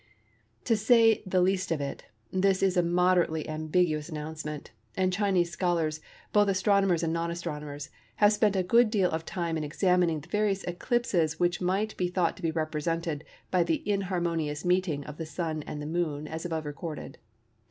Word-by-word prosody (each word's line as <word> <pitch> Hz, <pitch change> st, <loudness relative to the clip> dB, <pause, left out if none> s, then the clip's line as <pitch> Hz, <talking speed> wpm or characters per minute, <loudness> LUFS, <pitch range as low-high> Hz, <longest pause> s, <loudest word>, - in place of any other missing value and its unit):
To 225 Hz, -, +2 dB
say 225 Hz, +1 st, +5 dB
the 185 Hz, -1 st, +2 dB
least 185 Hz, 0 st, +1 dB
of 160 Hz, -, +1 dB
it, 140 Hz, -1 st, -5 dB, 0.3 s
this 190 Hz, 0 st, +2 dB
is 190 Hz, -1 st, +3 dB
a 175 Hz, -, +4 dB
moderately 175 Hz, -2 st, +2 dB
ambiguous 155 Hz, 0 st, 0 dB
announcement, 150 Hz, -1 st, -6 dB, 0.3 s
and 185 Hz, -1 st, +1 dB
Chinese 185 Hz, -3 st, +1 dB
scholars, 165 Hz, -4 st, 0 dB, 0.3 s
both 205 Hz, -1 st, +5 dB
astronomers 190 Hz, -2 st, +2 dB
and 165 Hz, 0 st, 0 dB
non 170 Hz, 0 st, -1 dB
astronomers, 150 Hz, -4 st, -5 dB, 0.2 s
have 205 Hz, 0 st, +5 dB
spent 210 Hz, -1 st, +2 dB
a 185 Hz, -, +2 dB
good 230 Hz, +5 st, +4 dB
deal 200 Hz, -5 st, +2 dB
of 160 Hz, 0 st, -3 dB
time 170 Hz, -3 st, -2 dB
in 155 Hz, -, -2 dB
examining 170 Hz, 0 st, +1 dB
the 155 Hz, -, -15 dB
various 205 Hz, -1 st, 0 dB
eclipses 175 Hz, -, 0 dB
which 175 Hz, +1 st, +1 dB
might 195 Hz, +4 st, 0 dB
be 180 Hz, -, +1 dB
thought 175 Hz, -2 st, 0 dB
to -, -, -12 dB
be 165 Hz, -, 0 dB
represented 160 Hz, 0 st, -2 dB, 0.3 s
by 185 Hz, -, +3 dB
the 170 Hz, +2 st, -1 dB
inharmonious 175 Hz, -6 st, -1 dB
meeting 180 Hz, -5 st, +1 dB
of 150 Hz, 0 st, -8 dB
the 165 Hz, -, -4 dB
Sun 160 Hz, -2 st, -3 dB
and 150 Hz, -, -5 dB
the 150 Hz, -, -5 dB
Moon 155 Hz, -2 st, -2 dB
as 160 Hz, +2 st, -6 dB
above 160 Hz, -2 st, -3 dB
recorded. 150 Hz, -1 st, -6 dB
175 Hz, 175 wpm, -28 LUFS, 155-190 Hz, 0.3 s, say